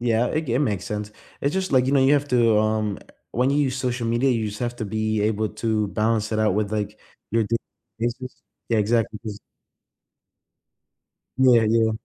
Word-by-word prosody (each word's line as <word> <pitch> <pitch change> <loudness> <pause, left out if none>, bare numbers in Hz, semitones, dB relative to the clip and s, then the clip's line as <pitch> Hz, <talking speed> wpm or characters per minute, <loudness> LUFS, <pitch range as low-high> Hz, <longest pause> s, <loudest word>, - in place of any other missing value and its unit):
Yeah, 120 0 +2
it 155 - -1
ge - - -4
it - - +2
makes 105 -10 0
sense, 105 -2 -4 0.3
it's 140 +2 0
just 190 -3 -1
like, 130 -1 +4
you 135 - +1
know, 140 - +4
you 135 - +5
have 145 0 +2
to, 115 -3 +4
um 110 -1 0
eh, - - -18 0.3
when 125 +3 +1
you 140 - +1
use 135 -3 +1
social 125 -2 -2
media, 120 +4 +2
you 115 -3 0
just 105 0 -7
have 120 0 -2
to 115 - -4
be 110 0 -1
able 110 0 0
to 110 -1 -1
balance 110 +1 0
it 110 - 0
out 110 -3 +2
with, 105 -1 0
like, 105 -1 -3 0.3
your 115 0 +2
di 115 +3 0 0.4
this 120 +1 0
is 130 0 -9 0.3
Yeah, 115 -2 +2
exactly, 110 0 +1
'cause 105 -3 -6 2.0
Yeah, 125 -3 +6
yeah. 115 0 +3
115 Hz, 210 wpm, -23 LUFS, 110-125 Hz, 2.0 s, Yeah